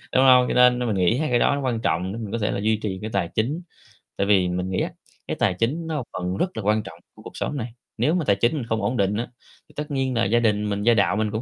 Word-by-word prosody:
đúng 130 - +5
hông? 125 -1 +7
Cho - - -1
nên 125 0 +5
nên 125 - -1
mình 110 - 0
nghĩ 95 +6 +2
hai 155 +1 -1
cái 120 -1 +2
đó 145 - +3
nó 140 - -3
quan 125 -4 -1
trọng 90 0 0
để 115 - -6
mình 105 -3 -6
có 115 - -1
thể 105 - 0
là - - -2
duy 110 +1 +1
trì 95 -3 -3
cái 110 - -4
tài 95 -4 0
chính. 135 +10 -1 0.6
Tại 100 - 0
vì 95 -3 +3
mình 90 +1 -2
nghĩ 95 - -1
á, - - -2 0.4
cái - - -2
tài - - +2
chính 140 - -1
nó 160 - -3
một 130 - -3
phần 90 +1 -3
rất 180 - -2
là 110 - -3
quan 105 +1 +1
trọng - - -11 0.2
của - - -15
cuộc - - -10
sống 145 - -3
này. 115 -2 -5 0.2
Nếu 125 +8 +2
mà 170 -4 -1
tài 100 - +3
chính 120 +8 +1
mình 140 -6 -3
không 110 -2 -1
ổn 115 +5 -1
định 100 0 +1
á 115 +3 -2 0.4
thì - - -20
tất 150 +1 -5
nhiên 135 -2 -1
là 115 - +2
gia 115 +4 +3
đình 105 -2 +1
mình, 100 0 -2
gia 120 +2 +5
đạo 100 -2 +2
mình 105 -1 0
cũng 110 - -2
110 Hz, 325 wpm, -23 LUFS, 100-125 Hz, 0.6 s, hông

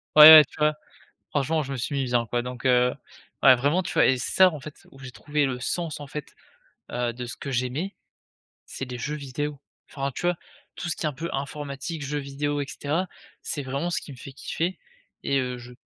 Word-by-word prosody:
ouais, 155 +1 +12
ouais, 155 -1 +12
tu - - -18
vois? 150 0 +3 0.6
Franchement 155 +2 0
je 140 - -5
me 135 - -3
suis 125 +4 -3
mis 135 -1 0
bien, 120 -2 +1
quoi 120 +2 -1
donc 125 +1 -6
heu, 125 0 +4 0.5
ouais 130 -1 +9
vraiment 145 +9 +1
tu - - -5
vois? - - +5
Et 130 -1 +3
c'est 125 - -3
ça 185 -1 +6
en 155 -4 -7
fait 150 +1 -12
où 135 - -17
j'ai 130 -1 -9
trouvé 145 +1 -1
le 125 -2 -3
sens 160 +3 -2
en 145 - -7
fait, 150 0 -8 0.6
heu, 120 -1 -1
de 125 +1 -6
ce 120 - -6
que 140 - -6
j'aimais, 130 +10 -2 0.7
c'est 135 - -6
des 125 -1 -6
jeux 150 +6 -3
vidéos. 145 0 -4 0.3
Enfin, 140 -1 -3
tu - - -6
vois? 175 - +2 0.4
Tout 175 - -5
ce 155 - 0
qui - - -6
est 155 - +2
un - - -7
peu 165 +5 -5
informatique, 140 +2 -5
jeux 145 +2 -2
vidéos 145 +1 -2
et 140 - -3
cetera, 165 +6 -2 0.3
c'est 145 - -3
vraiment 140 +6 -2
ce 175 - 0
qui - - -10
me 130 - -11
fait 135 - -10
kiffer 170 +6 -3 0.4
et 140 - +1
heu, 125 -1 -3
je 125 0 -11
140 Hz, 235 wpm, -25 LUFS, 125-150 Hz, 0.7 s, ouais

